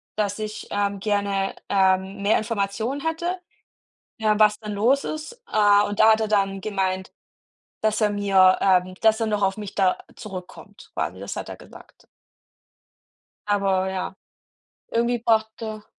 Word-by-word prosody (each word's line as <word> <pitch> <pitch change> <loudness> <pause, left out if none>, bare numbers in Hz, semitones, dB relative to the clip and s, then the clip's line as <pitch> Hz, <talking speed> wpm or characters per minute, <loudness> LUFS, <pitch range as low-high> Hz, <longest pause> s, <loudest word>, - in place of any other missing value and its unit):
dass 205 -1 -1
ich, 215 0 -6
ähm, 200 -1 -1
gerne, 200 -1 -1
ähm, 190 0 +2
mehr 205 +2 +3
Informationen 220 +4 -2
hätte, 340 +3 -2 0.8
ja, 215 -2 +2
was 210 -1 +4
denn 210 -1 -6
los 245 +7 +2
ist. 315 +11 -6
Äh, 205 -1 +5
und 205 0 -5
da 220 - +7
hat 220 - 0
er 220 - 0
dann 195 -2 +1
gemeint, 190 -2 -2 0.7
dass 215 0 +1
er 210 - +4
mir 195 -2 +4
ähm, 185 -1 +3
dass 220 0 +4
er 225 - +1
noch 210 -1 -1
auf 195 0 +2
mich 210 -2 -7
da 190 -2 +2 0.2
zurückkommt, 185 -3 -10
quasi, - - -3
das - - -6
hat - - -5
er - - -6
gesagt. - - -16 1.4
Aber 195 -2 +1
ja, 190 0 -4 0.8
irgendwie 235 +1 +1
braucht 220 -1 +2
er 215 -1 -6
205 Hz, 155 wpm, -23 LUFS, 195-220 Hz, 1.4 s, da